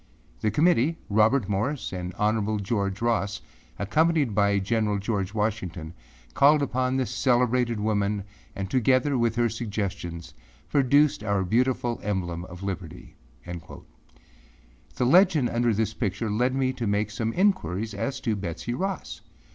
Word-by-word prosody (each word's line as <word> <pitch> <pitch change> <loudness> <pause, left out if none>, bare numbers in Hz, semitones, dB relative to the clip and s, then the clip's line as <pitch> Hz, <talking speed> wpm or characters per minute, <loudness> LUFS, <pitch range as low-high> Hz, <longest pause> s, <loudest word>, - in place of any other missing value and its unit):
The 110 - +1
Committee, 155 - +2
Robert 110 +2 +3
Morris 110 +8 -2
and 90 -1 -4
Hon. 110 0 +1
George 100 0 -2
Ross, 105 -4 0 0.4
accompanied 150 - +2
by 100 0 +3
General 105 +1 0
George 100 -1 -2
Washington, 95 -7 -2 0.4
called 145 - +5
upon 130 0 0
this 130 -4 -1
celebrated 125 -2 +1
woman 105 -1 0 0.3
and 95 -1 -3
together 130 +5 +2
with 115 -2 +1
her 120 0 +2
suggestions, 100 -7 -4 0.4
produced 145 -2 +3
our 100 -2 0
beautiful 120 +4 0
emblem 90 -4 -3
of 90 +1 -10
liberty.â 85 -3 -8 1.1
The 125 - 0
legend 160 -3 +5
under 120 0 +2
this 110 0 0
picture 105 -1 -2
led 125 +5 +1
me 130 -1 +1
to 120 -4 -3
make 105 +1 0
some 110 +1 -2
inquiries 110 - 0
as 135 +7 -3
to 115 -4 0
Betsey 95 +4 -4
Ross. 190 +7 -4
110 Hz, 135 wpm, -26 LUFS, 100-130 Hz, 1.1 s, called